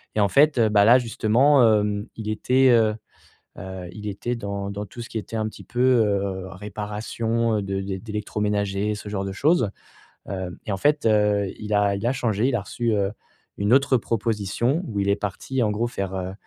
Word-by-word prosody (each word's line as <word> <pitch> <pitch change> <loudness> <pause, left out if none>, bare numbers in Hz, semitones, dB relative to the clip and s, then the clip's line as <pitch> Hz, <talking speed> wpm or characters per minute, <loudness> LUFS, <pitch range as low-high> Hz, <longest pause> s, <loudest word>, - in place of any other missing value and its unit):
Et - - +1
en 100 -2 +3
fait, 145 +3 +4
heu, 115 -2 +4
bah, 105 -1 +5
là, 120 +3 +8
justement, 125 +4 +3
hem, 105 -1 +2
il 110 -1 -5
était, 130 +4 +3
heu, 110 -2 +4 0.6
heu, 95 -2 -7
il 105 0 -8
était 120 +5 -3
dans 100 -2 -4
dans 100 +1 -5
tout 120 - -11
ce 115 - -9
qui - - -9
était 115 +1 -6
un 110 0 -1
petit - - -12
peu, 125 - -5
heu, 100 -7 +2
réparation, 105 +3 -2
heu, - - -2
de 95 0 -3
d'é 95 -1 -4
d'électroménager, 105 -1 -2
ce 105 - -8
genre 100 -1 -3
de 95 - -3
choses. 130 - +2 0.6
Hem 95 -2 -5
et 105 - -3
en - - -2
fait, 145 +4 +1
heu, 105 -2 +3
il 105 0 -4
a 100 -1 +3
il 100 +4 -4
a 125 - +3
changé, 120 -3 0
il 125 - 0
a 105 - 0
reçu, 120 +4 -2
heu, 100 -1 0 0.5
une 100 +3 0
autre 135 -1 +4
proposition 115 - -1
où 105 -3 -3
il 100 - 0
est 100 - +4
parti, 105 +6 -3
en 105 - +1
gros, 115 +3 -1
faire, 100 -5 -4
heu, 95 0 -4
105 Hz, 210 wpm, -24 LUFS, 100-115 Hz, 0.6 s, là